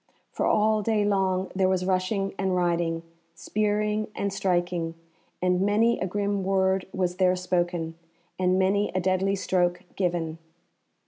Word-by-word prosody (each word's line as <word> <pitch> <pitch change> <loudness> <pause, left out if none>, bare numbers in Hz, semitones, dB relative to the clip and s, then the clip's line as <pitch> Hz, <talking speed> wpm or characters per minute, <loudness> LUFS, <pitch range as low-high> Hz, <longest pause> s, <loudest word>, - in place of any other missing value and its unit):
For - - -1
all 215 0 +3
day 210 0 +1
long 190 -2 +1
there 190 -1 +3
was 185 -1 0
rushing 195 +1 0
and 190 -1 +1
riding, 170 -2 0 0.3
spearing 210 0 0
and 200 -1 -2
striking, 175 -3 -1 0.5
and 180 0 +2
many 215 +4 +3
a 185 - -1
grim 200 +1 -1
word 190 -1 +1
was 180 -1 -1
there 185 -1 +3
spoken, 175 -2 -1 0.5
and 185 0 +2
many 195 +2 +2
a - - +2
deadly 190 +2 +1
stroke 180 -2 0
given. 170 -3 -1
185 Hz, 140 wpm, -26 LUFS, 180-200 Hz, 0.5 s, all